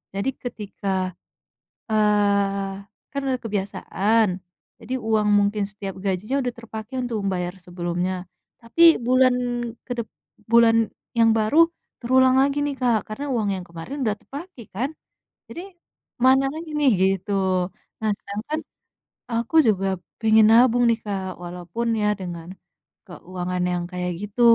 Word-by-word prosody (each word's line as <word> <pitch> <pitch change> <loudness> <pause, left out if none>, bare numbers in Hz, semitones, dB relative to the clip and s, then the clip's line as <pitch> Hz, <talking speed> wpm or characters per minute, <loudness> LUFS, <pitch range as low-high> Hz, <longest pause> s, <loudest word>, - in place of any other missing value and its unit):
jadi 200 +7 0 0.2
ketika, 205 -4 -5 1.0
eee, 200 -2 +1 0.3
kan 280 - -2
udah 255 -2 0
kebiasaan, 210 +1 +1 0.5
jadi 240 +2 -5
uang 215 -1 +2
mungkin 205 0 +1
setiap 200 -2 -6
gajinya 200 +8 -1
udah 245 -2 -2
terpakai 230 +1 -9
untuk 240 -2 -3
membayar 180 -1 -2
sebelumnya, 175 +1 -3 0.5
tapi 330 +8 +6
bulan 255 0 +5 0.5
kedep 235 -3 -4 0.5
bulan 230 -1 +6 0.3
yang 225 -1 +5
baru 290 +10 +5 0.3
terulang 260 +1 +4
lagi 280 +1 +2
nih 280 -2 -3
Kak, 235 -4 +2
karena 280 +7 -4
uang 215 -3 0
yang 185 -2 -4
kemarin 170 - -7
udah 210 - +2
terpakai 285 - -9
kan, 240 +8 -2 0.6
jadi 345 - -8 0.6
"Mana 265 +1 +5
lagi 320 +1 -7
nih?" 280 -3 +4
Gitu. 195 +1 +1 0.7
Nah 215 - +2
sedangkan 215 +10 -4 0.7
aku 235 +7 -2
juga 195 -2 +2 0.4
pengen 220 -1 +6
nabung 245 +1 +5
nih 230 -1 +2
Kak, 190 -3 -4
walaupun 180 +6 -4
ya 210 - +1
dengan 175 -3 -7 0.6
keuangan 180 0 -4
yang 175 -1 -1
kayak 180 0 -2
gitu, 210 +4 -4
215 Hz, 130 wpm, -23 LUFS, 195-245 Hz, 1.0 s, tapi